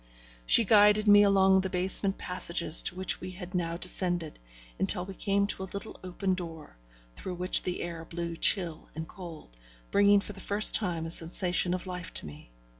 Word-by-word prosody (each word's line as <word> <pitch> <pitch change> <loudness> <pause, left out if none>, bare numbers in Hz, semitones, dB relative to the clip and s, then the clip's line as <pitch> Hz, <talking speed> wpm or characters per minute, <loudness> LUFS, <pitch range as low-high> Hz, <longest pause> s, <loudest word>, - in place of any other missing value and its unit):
She 230 - +7
guided 210 +1 +4
me 205 0 +7
along 195 -1 +3
the 190 - -4
basement 190 +2 0
passages 170 -2 +1
to - - -1
which 185 +1 -2
we 185 - -7
had 180 0 -10
now 170 -2 -3
descended, 175 -3 -2 0.4
until 180 - 0
we 195 - -9
came 200 +1 -1
to 200 - -5
a 190 - -7
little 200 - -8
open 185 +1 -3
door, 165 - -8 0.4
through 180 - -7
which 180 +1 +2
the 180 - -4
air 170 -1 -7
blew 170 0 -6
chill 170 -1 +1
and 160 0 -6
cold, 165 - -12 0.4
bringing 205 0 +4
for 210 - -8
the 195 - -12
first 205 +2 +4
time 175 -6 0
a 165 - -6
sensation 175 +1 -1
of 185 - -7
life 180 -2 -7
to - - -2
me. 75 -4 -12
180 Hz, 190 wpm, -28 LUFS, 170-195 Hz, 0.4 s, She